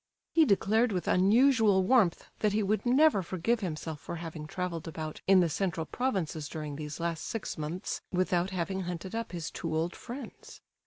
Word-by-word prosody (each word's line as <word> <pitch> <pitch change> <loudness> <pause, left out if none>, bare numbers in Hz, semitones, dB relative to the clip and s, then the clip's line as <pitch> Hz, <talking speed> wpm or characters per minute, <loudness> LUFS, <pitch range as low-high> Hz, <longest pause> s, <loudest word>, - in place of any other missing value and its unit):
He 325 -2 +6
declared 220 +1 +3
with 180 -3 -2
unusual 215 0 +4
warmth 195 -4 +3
that 210 -1 +1
he 215 0 +2
would 215 +4 0
never 270 -3 +5
forgive 185 +6 0
himself 160 -5 -4
for 160 - -6
having 160 -2 -6
travelled 175 -2 -4
about 155 -1 -6
in 190 -1 +7
the 175 - +3
central 165 0 -1
provinces 175 - -2
during 150 -2 -5
these 150 +1 -6
last 165 -2 -2
six 225 - -4
months 155 +4 -4
without 180 0 +1
having 190 0 -2
hunted 180 +1 -5
up 230 0 -3
his 170 -3 -4
two 160 -2 -3
old 165 +3 -1
friends. 255 +4 -9
185 Hz, 175 wpm, -30 LUFS, 165-215 Hz, -, in